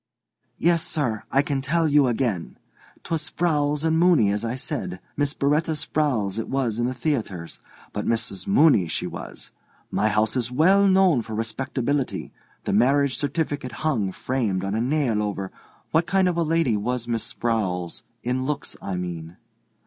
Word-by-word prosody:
"Yes, 170 0 +3
sir. 125 -11 -2
I 140 - +4
can 140 -2 -1
tell 160 +4 +1
you 145 -2 +4
again. 115 -7 -1 0.5
'Twas 165 -2 -2
Sprowls 150 -3 +1
and 160 0 +2
Mooney, 165 - +5
as 105 +1 -1
I 115 +1 -2
said. 130 - -4 0.2
Miss 145 0 0
B'retta 150 +3 +1
Sprowls 130 -9 0
it 115 - -4
was 125 -5 0
in 120 - +1
the 130 - -3
theatres, 115 - -3 0.3
but 105 - -3
Missis 110 -5 -1
Mooney 105 - +5
she - - -2
was. - - -7 0.4
My 110 - +2
house 105 +2 +1
is 125 -1 -1
well 190 +9 +5
known 190 -8 +4
for 110 -1 -6
respectability. 130 +4 -2 0.3
The - - -1
marriage 135 +5 +3
certificate 145 -3 -2
hung, 110 -11 +1
framed, 105 -6 -1
on 95 - -2
a 110 - 0
nail 125 -4 +1
over—" 100 -2 -3 0.4
"What 165 +2 +2
kind 190 0 +3
of 180 - +1
a 170 - +1
lady 165 -7 +2
was 120 +3 -2
Miss 115 -2 -1
Sprowls—in 115 +3 -2
looks, 145 +1 -3
I 95 - -3
mean?" 85 -1 -5
130 Hz, 165 wpm, -24 LUFS, 110-150 Hz, 0.5 s, Mooney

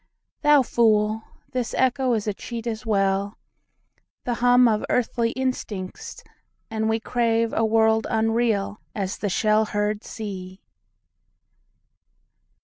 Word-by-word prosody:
Thou 295 -2 +5
fool; 220 -2 +2 0.3
this 250 -2 -2
echo 260 -1 +2
is 215 -3 -1
a 210 - -1
cheat 230 +3 -7
as 225 0 -4
well,—The 200 +4 -4
hum 245 +1 +5
of 215 -2 +1
earthly 235 -1 +1
instincts; 230 -8 -4 0.5
and 220 0 -1
we 225 0 +1
craveA 230 -1 0
world 220 0 +3
unreal 220 -2 0 0.2
as 195 -2 -3
the 205 - -1
shell 215 +3 +2
heard 210 0 -2
sea. 190 -4 -7
220 Hz, 110 wpm, -24 LUFS, 210-235 Hz, 0.5 s, Thou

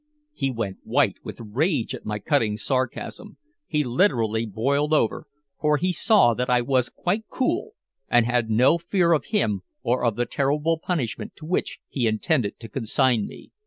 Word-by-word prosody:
He 135 - -1
went 115 -6 -3
white - - +1
with - - -7
rage 125 - -1
at - - -8
my 105 0 -2
cutting 110 -2 +1
sarcasm. 130 - -3 0.3
He 150 -2 +1
literally 115 - +1
boiled 140 +9 0
over, 115 -7 0 0.3
for 150 -1 +2
he 180 +4 0
saw 200 - +4
that 125 +2 -2
I 125 0 +4
was 125 0 +1
quite 205 +5 -2
cool 425 - -1 0.4
and 120 -1 +4
had 120 -2 0
no 125 +9 +4
fear 170 0 +2
of 155 - +1
him 110 - 0 0.2
or 125 0 +1
of 115 -3 +2
the 120 - 0
terrible 150 +5 0
punishment 155 -11 -3
to 155 - -11
which 175 +3 -2
he 125 -4 -1
intended 110 - 0
to 115 - -7
consign 120 -1 +1
me. - - -13
130 Hz, 170 wpm, -24 LUFS, 115-160 Hz, 0.4 s, saw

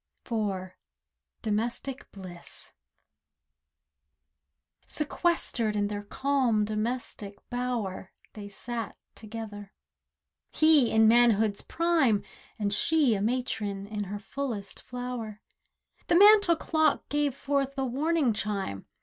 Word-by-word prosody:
DOMESTIC 235 +5 -2
BLISS 185 -3 -10 2.1
IV - - -25
Sequestered 300 -8 0
in 205 -1 0
their 205 -1 -3
calm 245 -1 +1
domestic 215 -1 -3
bower, 240 -7 -3 0.2
They 205 -1 -8
sat 230 +1 -5 0.2
together. 210 -2 -8 0.8
He 310 -6 +5
in 220 0 +5
manhood's 220 -3 +4
prime 320 -11 +2 0.3
And 205 -2 -1
she 295 +2 +3
a 200 - -1
matron 210 -4 -2
in 205 0 -4
her 200 +2 -5
fullest 215 -2 -5
flower. 245 -4 -6 0.7
The - - +3
mantel 405 -3 +7
clock 315 -2 +1
gave 290 -2 0
forth 275 -1 -1
a 270 - 0
warning 280 0 +1
chime. 200 - -3
230 Hz, 100 wpm, -28 LUFS, 205-275 Hz, 2.1 s, mantel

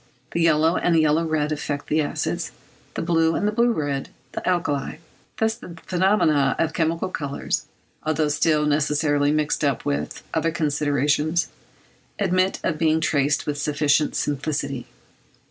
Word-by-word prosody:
The 170 - -1
yellow 165 +1 +3
and 170 -2 +3
yellow 155 +1 +3
red 155 -1 0
affect 145 -1 -3
the 155 +1 +1
acids, 145 - -2 0.4
the - - -2
blue 165 -1 +2
and 210 +1 0
blue 235 +1 +4
red 145 -8 -2 0.2
the - - -4
alkalis; 155 -6 -1 0.4
thus 220 0 +1
the 180 -7 -11
phenomena 180 -6 +2
of 160 -1 0
chemical 165 +2 0
colours, 145 -5 -3 0.4
although 155 -1 +1
still 150 0 +2
necessarily 145 0 +2
mixed 155 0 0
up 140 -3 0
with 70 +1 -2
other 165 - +1
considerations, 150 0 +1 0.7
admit 185 -1 +1
of 155 -3 -1
being 160 -1 +3
traced 150 -2 +1
with 145 -1 -2
sufficient 150 0 +1
simplicity. 140 -2 -2
155 Hz, 140 wpm, -23 LUFS, 145-165 Hz, 0.7 s, blue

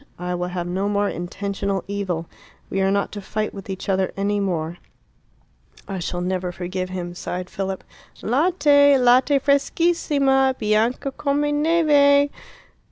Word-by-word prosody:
I 180 +1 -3
will 180 0 -2
have 180 -1 -4
no 190 +3 -1
more 205 0 +1
intentional 195 +1 -3
evil. 190 -5 -3 0.5
We 195 - 0
are 190 - +2
not 200 0 0
to 205 - -6
fight 215 +2 -3
with 195 -1 -10
each 190 -1 -5
other 190 -1 +1
any 205 +1 0
more." 175 -3 -2 1.1
"I 195 -2 -4
shall 175 0 -3
never 180 0 -2
forgive 185 +1 -4
him," 175 -1 -5
sighed 180 0 -5
Philip. 195 -1 -4 0.4
"Latte! 285 0 +4
latte 255 +3 +4
freschissima! 280 -2 +2
bianca 220 +5 0
come 280 +1 -1 0.2
neve!" 290 -3 +4
200 Hz, 140 wpm, -22 LUFS, 185-275 Hz, 1.1 s, Latte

